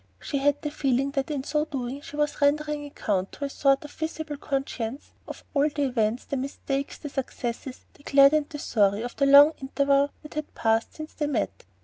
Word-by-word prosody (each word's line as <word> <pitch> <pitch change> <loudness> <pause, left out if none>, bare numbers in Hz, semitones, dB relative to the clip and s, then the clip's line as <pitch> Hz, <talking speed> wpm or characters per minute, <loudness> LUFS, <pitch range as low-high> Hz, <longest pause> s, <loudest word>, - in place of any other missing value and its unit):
She 280 - -2
had 290 +1 +2
the 295 - -2
feeling 275 -2 0
that 275 0 -2
in 285 -3 -2
so 300 +2 0
doing 270 -2 -4
she 290 - -10
was 295 0 -1
rendering 295 0 +1
account 195 -8 -2
to 285 - -4
a - - -3
sort 275 +1 +2
of 295 - -10
visible 315 -1 -4
conscience 270 -3 -4 0.2
of - - -8
all 290 +1 +3
the 290 0 -2
events, 235 -3 0
the 280 - -3
mistakes, 275 +1 -3
the 295 - -7
successes, 255 -2 -5
the - - -20
glad 275 0 +6
and 305 -1 +1
the 305 - -6
sorry 205 -5 +1
of 245 - -6
the 275 - +3
long 285 +3 +8
interval 280 +1 +2
that 300 - -11
had 305 0 -5
passed 225 0 +1
since 310 0 -8
they 295 - -2
met. 100 - -2
280 Hz, 210 wpm, -26 LUFS, 260-295 Hz, 0.2 s, long